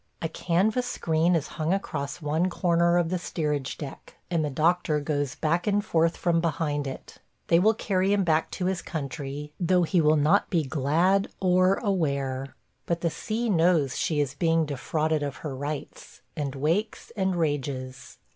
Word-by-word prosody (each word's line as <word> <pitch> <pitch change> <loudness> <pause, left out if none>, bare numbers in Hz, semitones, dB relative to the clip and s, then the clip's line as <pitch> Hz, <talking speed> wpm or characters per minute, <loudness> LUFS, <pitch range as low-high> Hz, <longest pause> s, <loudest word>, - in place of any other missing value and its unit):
A 165 - -1
canvas 205 +10 0
screen 165 -3 +1
is 155 -2 -1
hung 160 +4 +2
across 145 -5 -4
one 160 +5 +1
corner 170 -1 +2
of 170 -2 +1
the 180 0 -1
steerage 150 -5 -2
deck, 140 -3 -9 0.2
and 165 -2 +1
the 150 - -1
doctor 155 +2 +1
goes 145 -2 -2
back 170 +4 0
and 205 0 +1
forth 165 -3 +2
from 170 -2 +1
behind 150 -3 -1
it.... 135 - -8 0.3
They 170 - +6
will 215 +4 +4
carry 195 -2 0
him 205 -1 +3
back 160 -2 +1
to 180 - -3
his 185 -1 -1
country, 145 -1 -5
though 180 0 +3
he 170 +1 +2
will 155 0 +4
not 155 +7 +3
be 170 -5 +1
glad 160 +8 +2
or 185 0 +4
aware. 140 - -1 0.3
But 170 0 -1
the 170 - 0
sea 230 +7 -3
knows 165 - +3
she 155 -3 0
is 145 -2 0
being 165 +1 +2
defrauded 155 +2 -1
of 140 -1 -3
her 140 -3 -3
rights, 145 +2 -6
and 140 -2 -3
wakes 165 +15 -1
and 190 -3 0
rages. 135 -5 -3
165 Hz, 175 wpm, -26 LUFS, 145-180 Hz, 0.3 s, They